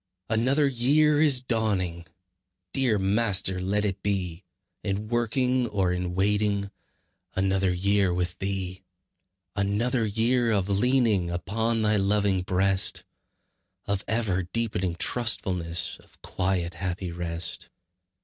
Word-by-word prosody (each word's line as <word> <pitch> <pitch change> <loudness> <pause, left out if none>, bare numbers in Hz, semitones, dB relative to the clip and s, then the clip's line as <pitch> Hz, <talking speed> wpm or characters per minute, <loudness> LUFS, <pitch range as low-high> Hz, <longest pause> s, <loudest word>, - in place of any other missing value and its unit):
Another 130 +7 +2
year 145 +4 +3
is 140 -5 +5
dawning! 100 -8 -1 0.7
Dear 125 -5 +2
Master, 95 -2 +1
let 100 +3 0
it 100 -2 -3
be 95 -3 -3 0.4
In 105 +1 -3
working 125 +1 0
or 95 -4 0
in 90 0 -3
waiting, 100 0 0 0.6
Another 95 0 +1
year 100 +1 +1
with 90 0 -1
Thee. 95 -1 -4 0.7
Another 110 +5 0
year 115 +3 +1
of 100 -2 0
leaning 105 -3 +2
Upon 110 +6 -1
Thy 105 0 +2
loving 100 -1 +1
breast, 95 +1 +3 0.8
Of 100 0 -2
ever 110 -5 0
deepening 95 -2 -2
trustfulness, 90 -4 +1
Of - - -23
quiet, 90 -2 -2
happy 90 0 -4
rest. 85 0 -3
100 Hz, 110 wpm, -26 LUFS, 90-115 Hz, 0.8 s, is